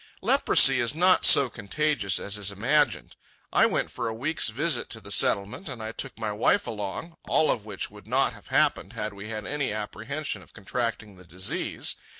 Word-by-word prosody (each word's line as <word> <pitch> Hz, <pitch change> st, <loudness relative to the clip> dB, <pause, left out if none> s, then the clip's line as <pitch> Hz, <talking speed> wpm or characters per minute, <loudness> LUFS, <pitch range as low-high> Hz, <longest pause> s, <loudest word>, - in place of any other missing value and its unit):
Leprosy 135 Hz, -1 st, +5 dB
is 120 Hz, +4 st, 0 dB
not 185 Hz, +3 st, +4 dB
so 140 Hz, -, +7 dB
contagious 120 Hz, -, 0 dB
as 100 Hz, -, -2 dB
is 105 Hz, -1 st, +1 dB
imagined. 130 Hz, +9 st, 0 dB, 0.4 s
I -, -, +5 dB
went -, -, -1 dB
for 120 Hz, -2 st, -4 dB
a 110 Hz, -, -4 dB
week's 145 Hz, +3 st, 0 dB
visit 140 Hz, +4 st, 0 dB
to 110 Hz, -, -6 dB
the 100 Hz, -1 st, -7 dB
Settlement, 100 Hz, -, +1 dB
and 130 Hz, -4 st, -6 dB
I 110 Hz, -, -4 dB
took -, -, -6 dB
my 110 Hz, -2 st, -3 dB
wife 160 Hz, -, +1 dB
along—all 115 Hz, -, -2 dB
of 110 Hz, -, -3 dB
which 105 Hz, -3 st, -5 dB
would -, -, -15 dB
not -, -, +1 dB
have -, -, -15 dB
happened 95 Hz, +6 st, +1 dB
had 110 Hz, -2 st, -4 dB
we 100 Hz, +2 st, -9 dB
had 110 Hz, -1 st, -5 dB
any 145 Hz, -4 st, -2 dB
apprehension 110 Hz, +8 st, -4 dB
of -, -, -18 dB
contracting 105 Hz, -1 st, -4 dB
the 90 Hz, -, -15 dB
disease. 90 Hz, +3 st, -2 dB
115 Hz, 185 wpm, -26 LUFS, 105-140 Hz, 0.4 s, so